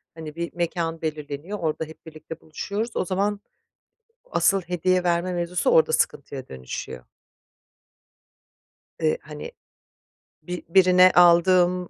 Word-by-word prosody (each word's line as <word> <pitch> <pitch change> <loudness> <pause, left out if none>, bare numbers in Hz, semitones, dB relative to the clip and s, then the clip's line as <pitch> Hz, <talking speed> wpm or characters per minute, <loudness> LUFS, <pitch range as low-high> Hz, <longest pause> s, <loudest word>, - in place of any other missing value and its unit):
hani, 155 -1 -8
bir 170 0 -5
mekân 170 -1 -2
belirleniyor, 155 +4 -5
orada 160 0 -2
hep 160 +1 -15
birlikte 155 0 -10
buluşuyoruz, 205 +8 -5
o 185 - 0
zaman 200 +3 -1 0.9
asıl 195 -1 +3
hediye 180 +1 0
verme 175 +1 0
mevzusu 175 - -1
orada 475 -1 +4
sıkıntıya 135 -2 -1
dönüşüyor. 65 -1 -8 1.9
Eee, 155 -1 +2
hani, 150 - -9 0.9
bi 180 -1 -6
birine 185 0 +6
aldığım 180 +1 +5
175 Hz, 110 wpm, -24 LUFS, 160-185 Hz, 1.9 s, birine